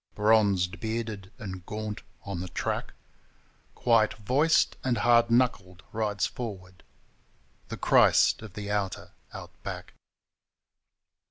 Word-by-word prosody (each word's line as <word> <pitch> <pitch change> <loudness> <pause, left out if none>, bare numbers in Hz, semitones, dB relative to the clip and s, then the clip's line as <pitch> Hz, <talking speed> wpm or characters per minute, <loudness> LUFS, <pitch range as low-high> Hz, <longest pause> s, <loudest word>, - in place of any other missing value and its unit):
Bronzed, 105 -4 +3
bearded 110 -4 -4
and 95 -6 -7
gaunt 105 -1 -5 0.2
on 100 -3 -4
the 90 - -5
track, - - -3 0.8
Quiet 115 -3 +3
voiced 140 +10 +2
and 125 -2 +1
hard 120 +2 +4
knuckled, 100 -7 +1
rides 105 -2 -1
forward 95 -8 -7 0.9
The - - -6
Christ - - +4
of 110 -4 -10
the 105 -1 -5
Outer 100 -2 -2 0.2
Out - - -9
back. - - -7
105 Hz, 110 wpm, -28 LUFS, 95-115 Hz, 0.9 s, hard